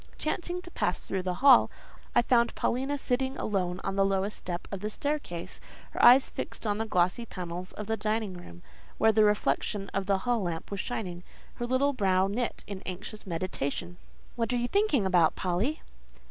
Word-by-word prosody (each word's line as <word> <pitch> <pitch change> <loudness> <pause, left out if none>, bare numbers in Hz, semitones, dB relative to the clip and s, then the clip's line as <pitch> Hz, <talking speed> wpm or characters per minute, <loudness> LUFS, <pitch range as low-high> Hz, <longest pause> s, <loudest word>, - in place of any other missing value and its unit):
Chancing 355 +3 -2
to 350 - -10
pass 180 - -1
through 190 - -2
the 180 -1 -2
hall, 265 -4 +8 0.5
I - - +5
found 235 -1 +3
Paulina 270 +4 0
sitting 265 0 -1
alone 185 -3 -1
on 195 - -2
the 195 0 +3
lowest 195 +1 0
step 175 -1 -5
of 200 - -4
the 210 +2 -3
staircase, 210 - -4 0.3
her - - -2
eyes 250 +3 +8
fixed - - -6
on 205 0 0
the 225 - -1
glossy 180 +4 +1
panels 180 -4 -6
of 210 - -6
the 225 +2 0
dining 215 -2 -1
room 85 - -11
door, - - -26 0.3
where 220 - +5
the 215 0 +4
reflection 205 0 +1
of 195 0 -1
the 200 -1 +3
hall 235 +3 0
lamp 170 -1 -4
was 200 - -3
shining; 185 -7 -4 0.3
her 240 - -4
little 270 +3 +2
brow 190 -5 +2
knit 225 +5 -2
in 200 -2 -7
anxious, 200 +3 -7
meditation. 175 -1 -3 0.4
"What 230 -1 -1
are - - +2
you 240 0 0
thinking 400 - +2
about, 175 -4 +4
Polly?" 195 - -1
205 Hz, 190 wpm, -29 LUFS, 185-240 Hz, 0.5 s, hall